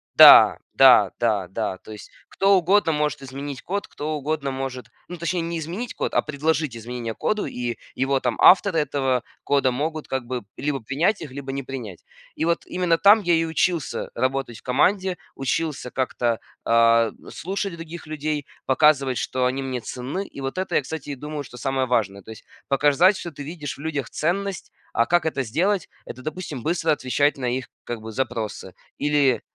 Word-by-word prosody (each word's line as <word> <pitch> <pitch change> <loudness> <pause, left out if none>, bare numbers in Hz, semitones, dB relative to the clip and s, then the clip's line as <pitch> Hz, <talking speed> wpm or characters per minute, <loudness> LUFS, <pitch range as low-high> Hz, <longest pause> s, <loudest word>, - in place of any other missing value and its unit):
Да, - - +10 0.2
да, 120 -7 +7
да, 105 -6 +1
да. 95 0 -3
То 110 - -13
есть, 105 - -10 0.2
кто 195 0 +4
угодно 185 0 +3
может 150 -2 -1
изменить 135 +1 -6
код, 200 +2 -3
кто 155 +1 -4
угодно 145 -1 -2
может, 130 -1 -5 0.2
ну 180 - -7
точнее, 170 +1 -1
не 170 0 -3
изменить 185 +10 -5
код, - - -2
а - - +3
предложить 150 -3 -1
изменения 115 0 -5
коду, 215 -1 -1
и 120 -2 -4 0.2
его 135 +1 +1
там 125 -3 -2
авторы, 190 -1 +6
этого 135 -4 0 0.2
кода, 140 -2 +2
могут 155 +4 -3
как 130 -2 -3
бы 125 -2 -4
либо 140 -3 -2
принять 160 - 0
их, 145 -5 -7
либо 135 0 -6
не 135 0 -4
принять. 120 -9 -8 0.3
И 160 - -1
вот 170 0 0
именно 180 -2 +1
там 210 +2 +7
я 175 -2 +2
и 165 0 +3
учился 165 -1 -1
работать 130 -2 -2
в - - -21
команде, 185 +8 +1 0.2
учился 135 0 -2
как-то, 120 -3 -1 0.2
а, 115 -1 +4 0.2
слушать 195 +1 -3
других 165 0 -8
людей, 155 -1 -3 0.2
показывать, 135 -2 +3
что 130 0 -1
они 135 +2 -2
мне 130 -2 -3
ценны. 135 - -5
И 140 - -10
вот 135 +6 -4
это, 190 - -2
я, - - +4
кстати, 145 +2 -7
и 140 - -3
думаю, 150 +2 -6
что 125 -1 -12
самое 130 +1 -1
важное. 100 -5 0
То 110 - -16
есть 110 - -12 0.2
показать, 145 +8 +4
что 170 - -6
ты 145 - -10
видишь 150 -2 -6
в 140 - -11
людях 145 -6 -3
ценность. 190 +4 -2 0.2
А 115 - +3
как 175 -1 +2
это 145 -4 0
сделать- 175 - 0 0.2
это, 130 - -9
допустим, 155 -3 -5
быстро 165 +1 0
отвечать 145 +1 +1
на 130 - -4
их, 125 +1 -1 0.2
как 120 -2 -5
бы, 110 0 -7
запросы, 110 -6 -4 0.2
или 145 -3 +2
140 Hz, 185 wpm, -23 LUFS, 125-165 Hz, 0.3 s, Да